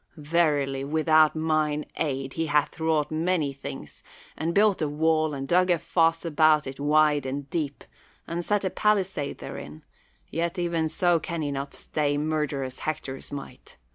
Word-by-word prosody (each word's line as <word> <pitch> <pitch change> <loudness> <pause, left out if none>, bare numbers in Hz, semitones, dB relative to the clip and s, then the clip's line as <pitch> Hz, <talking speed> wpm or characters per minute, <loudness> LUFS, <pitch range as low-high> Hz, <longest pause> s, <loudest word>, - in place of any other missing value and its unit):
Verily 145 -4 +1
without 155 +1 +3
mine 155 -1 0
aid 135 -3 -2
he 165 0 -2
hath 150 +2 +1
wrought 160 -2 +1
many 160 -2 0
things, 135 - -9 0.3
and 165 +1 -2
built 200 0 +3
a 155 - +1
wall 155 0 +1
and 135 0 -5
dug 180 +3 +3
a 175 - +4
foss 165 0 +1
about 155 -1 +4
it 135 0 -7
wide 150 0 +3
and 140 +1 -4
deep, 150 -4 -3 0.4
and 170 +1 -3
set 205 +1 0
a 185 - 0
palisade 195 -8 0
therein; 75 +1 -8 0.5
yet 170 +3 -2
even 170 -2 0
so 175 +1 +2
can 170 0 -4
he 145 - -2
not 140 0 -4
stay 145 -1 -1
murderous 145 -4 -2
Hector's 135 -3 -5
might. 140 -1 -9
155 Hz, 160 wpm, -26 LUFS, 145-165 Hz, 0.5 s, a